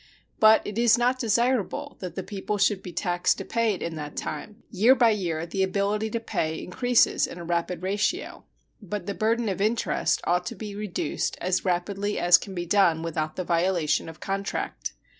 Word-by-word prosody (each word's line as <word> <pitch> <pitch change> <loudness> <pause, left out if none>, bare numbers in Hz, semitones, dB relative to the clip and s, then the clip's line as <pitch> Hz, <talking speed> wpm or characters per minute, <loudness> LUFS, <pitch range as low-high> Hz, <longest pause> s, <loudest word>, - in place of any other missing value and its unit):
But 220 0 +6
it 210 +2 -4
is 235 0 +5
not 250 +2 +1
desirable 235 -1 0
that 180 -2 -6
the 190 - -3
people 205 +1 -4
should 200 0 +2
be 180 - -8
taxed 175 +1 0
to - - -6
pay 230 -3 +1
it - - -7
in 165 - -3
that 150 -1 -7
time. 210 +9 -6
Year 230 +5 +5
by 235 -3 +5
year 170 -6 -2
the 190 +3 -3
ability 200 +3 0
to 230 - -2
pay 175 -8 -2
increases 245 +8 +2
in - - -9
a 170 - -7
rapid 170 +1 -2
ratio. 200 +2 -1 0.4
But 205 -2 -5
the 200 - -3
burden 225 +2 0
of 195 -1 -2
interest 220 +2 +1
ought 180 +1 0
to - - -5
be 210 -2 -7
reduced 205 -2 -3
as 185 +2 0
rapidly 195 +3 -1
as 175 0 +6
can 195 -2 -8
be 175 0 -3
done 170 -3 +3
without 155 -1 -3
the 185 - -3
violation 170 -3 +1
of 160 - -12
contract. 195 0 -3
195 Hz, 195 wpm, -26 LUFS, 175-215 Hz, 0.4 s, But